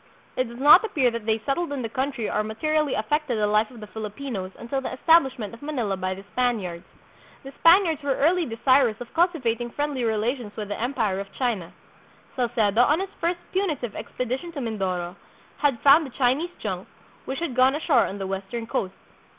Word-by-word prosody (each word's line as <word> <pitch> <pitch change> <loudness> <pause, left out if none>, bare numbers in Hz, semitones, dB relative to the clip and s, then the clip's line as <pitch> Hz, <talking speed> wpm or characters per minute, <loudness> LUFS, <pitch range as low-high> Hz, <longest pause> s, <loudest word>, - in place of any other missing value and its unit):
It 255 - +1
does 235 +1 -10
not 295 - +8
appear 285 - +1
that 230 -2 -6
they 220 0 +3
settled 285 +3 -1
in 275 -3 -3
the - - -1
country 260 -1 -2
or - - 0
materially 300 +7 0
affected 260 +3 -1
the 210 - +2
life 210 +1 +2
of 240 -3 -13
the - - -6
Fili 215 0 -6
pinos 210 -5 -5
until 270 +3 -3
the - - -4
establishment 265 -5 +2
of 230 - -12
Manila 250 -9 -2
by 185 0 -3
the 195 - -10
Spaniards. 200 -9 -1 0.6
The 270 - -9
Spaniards 335 -2 +5
were 280 -2 0
early 340 +3 +2
desirous 240 -1 +2
of 245 - -9
cultivating 255 -10 +1
friendly 290 -1 -2
relations 225 0 -1
with 210 -2 -5
the 205 - -4
Empire 230 -6 0
of 195 0 -7
China. 225 -10 -2 0.6
Salcedo, 235 -3 +2
on 295 +6 +4
his 390 0 -4
first 340 +1 0
punitive 310 - -1
expedition 255 +7 -4
to 295 - -5
Mindoro, 190 -6 -3 0.4
had 280 -6 +1
found 290 +2 +6
a - - -9
Chinese 265 +7 +1
junk, - - -4 0.4
which 265 - -4
had 320 -7 -3
gone 260 +2 +4
ashore 310 0 +3
on 195 - -6
the 195 - -4
western 195 +4 -4
coast. 195 -4 -3
245 Hz, 190 wpm, -25 LUFS, 215-285 Hz, 0.6 s, not